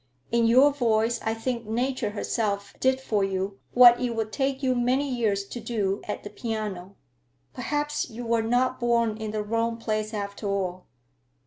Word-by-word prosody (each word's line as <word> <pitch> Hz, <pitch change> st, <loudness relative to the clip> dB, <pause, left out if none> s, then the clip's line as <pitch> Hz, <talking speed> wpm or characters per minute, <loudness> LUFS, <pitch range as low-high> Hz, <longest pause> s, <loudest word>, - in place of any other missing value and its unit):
In 235 Hz, -1 st, +3 dB
your 260 Hz, +5 st, +6 dB
voice 230 Hz, -3 st, +1 dB
I 225 Hz, 0 st, -1 dB
think 235 Hz, 0 st, -3 dB
Nature 245 Hz, 0 st, -1 dB
herself 205 Hz, -1 st, -2 dB
did 260 Hz, 0 st, +2 dB
for 215 Hz, -6 st, 0 dB
you 195 Hz, 0 st, -2 dB, 0.2 s
what 245 Hz, -1 st, +8 dB
it 245 Hz, -2 st, -1 dB
would 220 Hz, -1 st, -2 dB
take 270 Hz, +2 st, -1 dB
you 260 Hz, -1 st, +3 dB
many 250 Hz, +3 st, +1 dB
years 220 Hz, -6 st, 0 dB
to 240 Hz, -, -6 dB
do 210 Hz, -4 st, -1 dB
at 210 Hz, -, -4 dB
the 205 Hz, -, -8 dB
piano. 210 Hz, -4 st, -5 dB, 0.6 s
Perhaps 295 Hz, +3 st, -2 dB
you 240 Hz, +1 st, -7 dB
were 230 Hz, 0 st, +2 dB
not 245 Hz, +3 st, +1 dB
born 235 Hz, -2 st, +2 dB
in 220 Hz, -1 st, -4 dB
the 210 Hz, 0 st, -2 dB
wrong 230 Hz, +2 st, -1 dB
place 215 Hz, -2 st, -2 dB
after 200 Hz, -1 st, -4 dB
all. 185 Hz, -2 st, -2 dB
230 Hz, 175 wpm, -26 LUFS, 210-245 Hz, 0.6 s, what